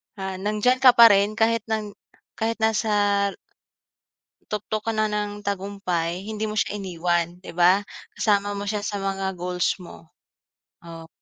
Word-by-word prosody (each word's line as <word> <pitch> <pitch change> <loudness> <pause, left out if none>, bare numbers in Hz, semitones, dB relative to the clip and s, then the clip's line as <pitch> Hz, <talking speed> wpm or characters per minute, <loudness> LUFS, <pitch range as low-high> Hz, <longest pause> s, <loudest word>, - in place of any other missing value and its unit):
ah, 190 -2 -5
nandiyan 215 +5 +1
ka 255 -2 +7
pa 230 -1 +9
rin 200 +1 +2
kahit 225 0 +2
nag 215 -2 -2 0.5
kahit 225 +1 0
nasa 205 -2 +2 1.2
Tuktok 215 +1 -3
kana 215 -1 +1
ng 205 0 -3
tagumpay, 190 -3 -3
hindi 215 0 -4
mo 215 - -5
siya 205 0 0
iniwan 175 -2 -1
'di - - -10
ba? 180 +4 +4 0.3
Kasama 205 -1 +1
mo 200 - -4
siya 205 +1 -2
sa 205 0 -4
mga 195 -1 -3
goals 180 0 -1
mo. 170 -3 -13 0.8
Oh. 165 -1 -10
205 Hz, 145 wpm, -24 LUFS, 185-215 Hz, 1.2 s, pa